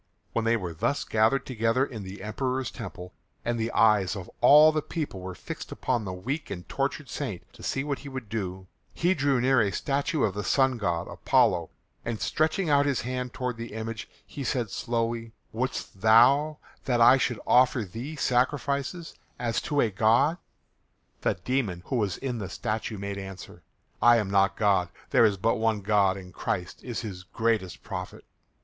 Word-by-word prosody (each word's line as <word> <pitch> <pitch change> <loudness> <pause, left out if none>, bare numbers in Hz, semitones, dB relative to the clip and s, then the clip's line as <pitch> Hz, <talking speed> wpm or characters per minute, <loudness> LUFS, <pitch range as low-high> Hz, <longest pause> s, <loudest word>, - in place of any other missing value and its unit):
When 115 - 0
they 115 +1 +3
were 90 -5 -5
thus 140 - -1
gathered 110 +5 +2
together 115 +1 +1
in 115 -6 -7
the 95 +1 -8
Emperor's 130 +4 -2
temple, 90 -5 -8 0.3
and 120 0 -1
the 115 +1 -1
eyes 105 -3 +3
of 95 -3 -8
all 150 +2 +8
the 155 0 0
people 150 - -4
were 90 0 -7
fixed - - -8
upon 120 -4 -1
the 95 - -4
weak 125 - -4
and 90 -4 -6
tortured - - -2
saint - - -5
to - - -15
see 135 - -1
what 145 -2 -2
he 140 - -9
would 130 -4 -6
do, 95 -3 -4 0.3
he 175 +2 +2
drew 140 -5 +1
near 130 0 +4
a 100 - +2
statue 140 - -1
of 100 - +1
the 105 +1 -4
sun 130 +4 +2
god 85 -4 -1
Apollo, - - +2 0.3
and 115 -2 -3
stretching 160 +4 0
out 145 -1 +4
his 140 -4 +1
hand 125 0 -3
toward 125 -2 -3
the 115 -1 -7
image 110 0 -5 0.2
he 140 - -7
said 120 -5 -1
slowly, 115 0 -2 0.2
"Wouldst 120 -5 -4
thou 135 +8 +5 0.3
that 125 -3 +1
I 120 +3 +8
should 125 -3 -1
offer 125 -1 +4
thee 120 - -7
sacrifices 140 +5 0 0.2
as 115 -2 -1
to 145 -1 +1
a 110 - +1
god?" 120 - +3 0.8
The - - +1
demon 95 -3 -2
who 130 - -1
was 105 -6 0
in 125 -3 -3
the 95 -3 -5
statue 110 +1 -3
made 100 0 -4
answer, 95 -2 -9 0.4
"I 120 +1 +7
am 105 -4 -1
not 100 0 +3
God. 100 -4 +2 0.2
There 115 - +6
is 105 -3 +2
but 115 +5 +1
one 110 -2 +1
God 100 -2 +2
and 90 -2 -11
Christ 90 -1 -3
is 120 -3 -4
his 100 -5 -6
greatest 105 -1 -1
prophet." 90 -2 -7
115 Hz, 185 wpm, -27 LUFS, 100-130 Hz, 0.8 s, all